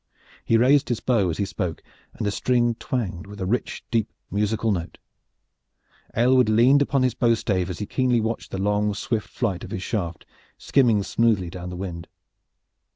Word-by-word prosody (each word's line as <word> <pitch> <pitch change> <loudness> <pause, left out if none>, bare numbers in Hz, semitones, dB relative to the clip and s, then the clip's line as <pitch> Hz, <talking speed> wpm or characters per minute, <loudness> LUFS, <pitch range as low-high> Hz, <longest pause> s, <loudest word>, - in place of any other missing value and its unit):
He 115 - +3
raised 135 +4 +4
his 120 - 0
bow 110 -8 +1
as 80 - -3
he 100 - 0
spoke, 90 -4 -4 0.3
and - - -4
the 100 - +1
string 120 +2 +1
twanged 105 -7 -4
with 105 0 -10
a 95 - -2
rich 120 +7 -2
deep 115 -3 +1 0.2
musical 105 +2 0
note. 85 -4 -3 1.2
Aylward 125 0 +4
leaned 125 +6 +5
upon 140 -2 +2
his 125 -3 +2
bow 120 -1 +3
stave 95 -4 -1
as 90 - -4
he 105 - -4
keenly 125 +1 +1
watched 110 +1 -3
the - - -4
long 105 +1 +1
swift 110 +1 -2
flight 100 -7 -2
of - - -7
his 95 - -4
shaft, 85 -7 -3 0.3
skimming 115 -7 +3
smoothly 105 -6 +1
down 90 -1 -7
the 90 - -6
wind. 90 -2 -6
105 Hz, 180 wpm, -24 LUFS, 95-120 Hz, 1.2 s, leaned